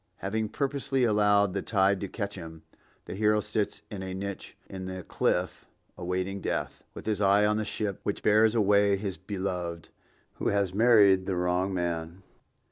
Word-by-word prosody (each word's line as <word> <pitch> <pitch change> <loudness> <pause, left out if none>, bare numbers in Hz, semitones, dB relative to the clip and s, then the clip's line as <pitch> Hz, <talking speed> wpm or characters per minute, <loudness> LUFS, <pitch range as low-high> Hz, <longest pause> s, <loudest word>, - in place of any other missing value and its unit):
Having 110 +3 -2
purposely 135 -1 -1
allowed 105 -3 +3
the 95 - -1
tide 95 -2 +2
to 100 - -3
catch 100 0 -4
him, 80 -4 -9 0.4
the - - -6
hero 105 +2 +2
sits 105 -1 -2
in 100 -2 -5
a 95 0 -5
niche 100 0 -6
in 95 -1 -7
the 95 -1 -6
cliff 90 +1 -1 0.3
awaiting 95 +2 -3
death, - - -3
with - - -9
his 105 -2 -1
eye 100 +1 +4
on 105 0 +2
the 110 - -1
ship 105 -2 -3
which 100 - -3
bears 110 +2 +4
away 100 -2 +4
his 95 -3 -4
beloved, 90 -3 -4 0.5
who - - -1
has 100 -2 +1
married 100 -4 +5
the 95 - 0
wrong 90 +2 0
man. 85 0 -3
100 Hz, 170 wpm, -28 LUFS, 95-105 Hz, 0.5 s, married